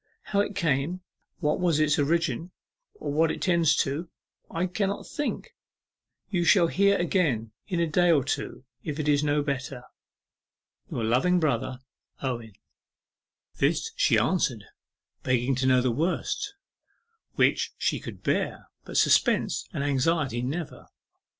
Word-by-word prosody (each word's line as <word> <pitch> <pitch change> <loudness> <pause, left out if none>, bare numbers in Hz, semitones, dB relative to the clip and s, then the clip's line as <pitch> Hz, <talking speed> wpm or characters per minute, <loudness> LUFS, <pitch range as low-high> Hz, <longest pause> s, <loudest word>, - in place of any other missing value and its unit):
How 200 - -1
it 205 0 0
came, 165 +1 0 0.4
what 150 +1 +1
was 170 -4 +2
its 155 0 +3
origin, 165 +1 0 0.5
or 280 - -4
what 160 +2 +3
it - - -3
tends 170 -4 +3
to, 155 +5 -4 0.4
I 170 +2 -1
cannot 195 +2 -2
think. 295 - -4 0.8
You 175 -4 +1
shall 170 +1 +5
hear 200 +2 +3
again 155 - 0 0.2
in 180 -4 -1
a 170 - +3
day 175 +3 +2
or 150 -5 +4
two, 135 0 -4 0.2
if 150 -2 -5
it 150 - -2
is 145 0 +3
no 145 0 +1
better... 135 -3 -4 1.1
Your 115 - -3
loving 130 +11 +3
brother, 130 -4 -1 0.4
OWEN.' 120 -5 -4 1.0
This - - +1
she - - +3
answered, - - +1 0.6
begging 130 +1 +1
to 130 +1 0
know 130 -1 +5
the 125 -1 +1
worst, 180 - -2 0.8
which - - +2
she - - 0
could - - -9
bear, - - -1
but - - -4
suspense - - +3
and 145 -7 -3
anxiety 140 -2 +1
never. 145 +6 -5
150 Hz, 140 wpm, -27 LUFS, 130-175 Hz, 1.1 s, shall